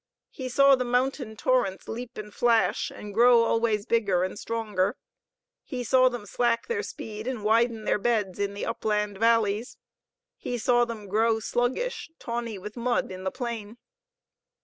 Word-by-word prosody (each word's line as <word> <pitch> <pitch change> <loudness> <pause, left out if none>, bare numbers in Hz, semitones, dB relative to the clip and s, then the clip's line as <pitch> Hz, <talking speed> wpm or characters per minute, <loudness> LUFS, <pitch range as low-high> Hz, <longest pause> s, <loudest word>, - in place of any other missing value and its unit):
He 255 -1 -6
saw 275 +2 +6
the 255 - -1
mountain 250 -2 -1
torrents 240 -6 0
leap 240 +2 -6
and 210 -1 -7
flash, 235 -2 +2
and 205 -1 -9
grow 235 +1 +6
always 225 -2 +1
bigger 200 -6 +2
and 185 +2 -4
stronger. 210 -4 -1 0.6
He 250 -4 -5
saw 255 +2 +4
them 245 -4 -6
slack 235 +2 0
their 460 -2 -1
speed 225 - -7
and 250 -5 -3
widen 225 +1 +2
their - - +1
beds 205 -4 0
in 200 0 -1
the 200 - -3
upland 210 -2 -1
valleys. 225 -1 +2 0.6
He 245 - -4
saw 240 +1 +3
them 225 -3 -7
grow 220 +3 +2
sluggish, 245 - -1
tawny 235 -3 -4
with 210 +2 -8
mud, 240 -4 0
in 185 0 -7
the - - +1
plain. 235 -3 -5
230 Hz, 160 wpm, -27 LUFS, 210-245 Hz, 0.6 s, saw